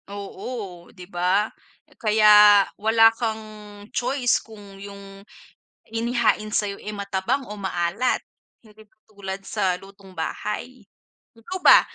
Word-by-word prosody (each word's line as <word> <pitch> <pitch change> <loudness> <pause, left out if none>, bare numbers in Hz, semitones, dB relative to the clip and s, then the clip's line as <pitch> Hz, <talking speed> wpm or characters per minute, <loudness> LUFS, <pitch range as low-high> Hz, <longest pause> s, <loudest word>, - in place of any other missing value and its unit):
Oo, 200 -2 -7
'di 180 - -12
ba? 185 +3 0 0.5
Kaya 210 -2 +7 0.2
wala 225 +1 +5
kang 220 -2 -3 0.5
choice 250 0 +1
kung 205 -3 -14
yung 200 -1 -11 0.7
inihain 225 -2 +1
sa'yo, 200 -1 -1
eh, 210 - -6
matabang 200 +6 -2
o 210 - -7
maalat 190 +5 0 0.4
hindi 215 -1 -18
katulad 200 -2 -9
sa 190 -4 0
lutong 195 -1 -15
bahay. 215 +7 -5 0.5
Ikaw 365 +12 -6
ba - - +9
210 Hz, 110 wpm, -23 LUFS, 195-225 Hz, 0.7 s, ba